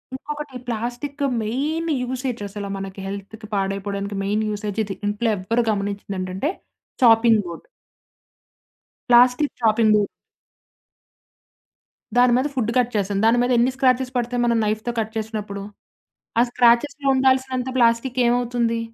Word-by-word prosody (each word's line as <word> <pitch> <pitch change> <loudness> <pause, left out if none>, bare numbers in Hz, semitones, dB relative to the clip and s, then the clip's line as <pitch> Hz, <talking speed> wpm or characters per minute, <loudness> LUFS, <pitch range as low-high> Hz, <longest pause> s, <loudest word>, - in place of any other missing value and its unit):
ఇంకొకటి 295 -1 -6
plastic 245 +5 -4 0.2
main 300 +9 -2
usage 250 -2 -3
అసలు 200 0 -6
మనకి 195 0 -7
హెల్త్‌కి 200 +2 -8
పాడైపోవడానికి 200 +1 -2
మెయిన్ 210 +2 0
యూసేజ్ 210 0 -4
ఇది. 195 -1 -5
ఇంట్లో 210 +3 0
ఎవ్వరు 225 +6 0
గమనించేదేంటంటే, 200 - -3 0.5
చాపింగ్ 225 -1 +6
బోర్డ్. 170 - -9 1.4
ప్లాస్టిక్ 250 +4 +5
చాపింగ్ 220 0 +3
బు 210 - +4 2.1
దాని 245 0 +5
మీద 265 - +1
ఫుడ్ 230 -2 0
కట్ 245 -1 +2
చేశాం. 200 -1 0
దాని 235 +2 +4
మీద 250 - 0
ఎన్ని 245 +2 +3
స్క్రాచెస్ 255 -1 +2
పడతాయి 245 0 -1
మనం 235 -1 +2
నైఫ్‌తో 215 +3 -1
కట్ 220 0 -3
చేసినప్పుడు? 210 -2 -4 0.8
ఆ - - +7
స్క్రాచెస్‌లో 255 +4 +3
ఉండాల్సినంత 260 -1 +1
ప్లాస్టిక్కు 240 +2 +2
ఏమవుతుంది? 240 -1 0
235 Hz, 120 wpm, -22 LUFS, 205-255 Hz, 2.1 s, ఆ